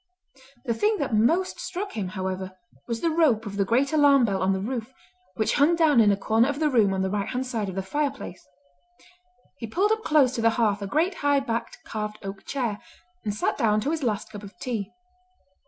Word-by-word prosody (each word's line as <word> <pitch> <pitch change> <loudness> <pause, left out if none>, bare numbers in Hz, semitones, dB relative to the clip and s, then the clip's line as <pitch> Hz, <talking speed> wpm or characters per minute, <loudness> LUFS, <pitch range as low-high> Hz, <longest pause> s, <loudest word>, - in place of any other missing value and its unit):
The 235 - +1
thing 420 - +1
that 280 -6 -2
most 320 +13 +2
struck 390 +2 -4
him, 205 -4 -3
however, 185 0 -5 0.3
was 230 -1 -3
the 335 - +1
rope 290 -9 +2
of 200 -1 -6
the 200 - +2
great 255 +8 +1
alarm 285 -4 +5
bell 195 -3 -1
on 190 +1 +2
the 190 - 0
roof, 230 +3 -4 0.4
which 215 - 0
hung 295 +4 +4
down 310 -7 +4
in 210 -2 +5
a 200 - +1
corner 225 +5 +2
of 285 0 -3
the 305 -2 +1
room 220 -6 +4
on 190 - 0
the 190 - 0
right 200 -1 -2
hand 255 +1 -2
side 225 -5 -3
of 185 - -7
the 195 - -2
fireplace. 280 -4 -3 1.2
He 230 - -5
pulled 390 - +1
up 440 0 0
close 285 -5 +3
to 235 - -2
the 230 - +5
hearth 210 -3 +1
a 200 - -3
great 325 - +1
high 285 -1 +3
backed 235 -4 -4
carved 210 -1 -4
oak 195 0 -7
chair, 240 -7 -2 0.4
and 210 - -1
sat 215 +1 -1
down 215 -2 +3
to 280 - -1
his 325 -1 -2
last 220 -4 -2
cup 205 -2 -8
of 205 -1 -12
tea. 220 -6 -4
230 Hz, 220 wpm, -25 LUFS, 205-285 Hz, 1.2 s, alarm